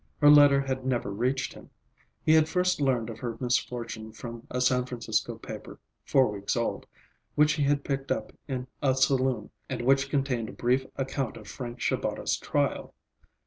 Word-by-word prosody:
Her 145 Hz, -1 st, +8 dB
letter 145 Hz, -2 st, +7 dB
had 130 Hz, -1 st, -3 dB
never 120 Hz, -5 st, -1 dB
reached 125 Hz, +6 st, -1 dB
him. -, -, -14 dB, 0.5 s
He 155 Hz, -, +4 dB
had 160 Hz, 0 st, +5 dB
first 180 Hz, -1 st, +1 dB
learned 125 Hz, -4 st, +1 dB
of 110 Hz, -, -10 dB
her 120 Hz, -2 st, -4 dB
misfortune 115 Hz, -3 st, -2 dB
from 115 Hz, +1 st, -8 dB
a 125 Hz, -, -2 dB
San 125 Hz, 0 st, +2 dB
Francisco 115 Hz, -3 st, -2 dB
paper, -, -, -9 dB, 0.3 s
four 130 Hz, -4 st, +4 dB
weeks 100 Hz, 0 st, -2 dB
old, 115 Hz, -, -2 dB, 0.5 s
which 150 Hz, 0 st, +5 dB
he 150 Hz, -, -2 dB
had 140 Hz, 0 st, +2 dB
picked 135 Hz, -1 st, -3 dB
up -, -, -2 dB
in 130 Hz, -3 st, -3 dB, 0.2 s
a 135 Hz, -3 st, +3 dB
saloon, 130 Hz, -4 st, +1 dB, 0.2 s
and -, -, -3 dB
which 135 Hz, +2 st, +3 dB
contained 135 Hz, -6 st, 0 dB
a -, -, -9 dB
brief 130 Hz, +2 st, +1 dB
account 135 Hz, -2 st, -2 dB
of 105 Hz, -2 st, -12 dB
Frank 120 Hz, +4 st, -7 dB
Shabata's -, -, 0 dB
trial. -, -, -1 dB
130 Hz, 175 wpm, -28 LUFS, 120-140 Hz, 0.5 s, Her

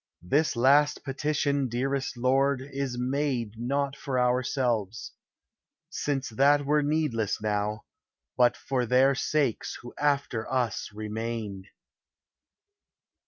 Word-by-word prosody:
This 145 Hz, -, +1 dB
last 140 Hz, +5 st, +4 dB
petition, 140 Hz, 0 st, 0 dB
dearest 130 Hz, +2 st, -2 dB
Lord! 135 Hz, +2 st, +2 dB
is 135 Hz, -2 st, -4 dB
made 125 Hz, -3 st, -1 dB
Not 140 Hz, +3 st, -1 dB
for 135 Hz, -2 st, -2 dB
ourselves; 125 Hz, -4 st, 0 dB, 0.8 s
since 135 Hz, -2 st, -2 dB
that 140 Hz, +5 st, +3 dB
were 150 Hz, +1 st, +3 dB
needless 145 Hz, -8 st, 0 dB
now; 105 Hz, 0 st, -1 dB, 0.5 s
But 120 Hz, -1 st, +3 dB
for 125 Hz, -3 st, -2 dB
their 130 Hz, +3 st, +4 dB
sakes 135 Hz, -3 st, -1 dB
who 120 Hz, -, -9 dB
after 140 Hz, -6 st, 0 dB
us 125 Hz, -5 st, -1 dB
remain." 110 Hz, -2 st, -5 dB
130 Hz, 105 wpm, -27 LUFS, 115-140 Hz, 0.8 s, last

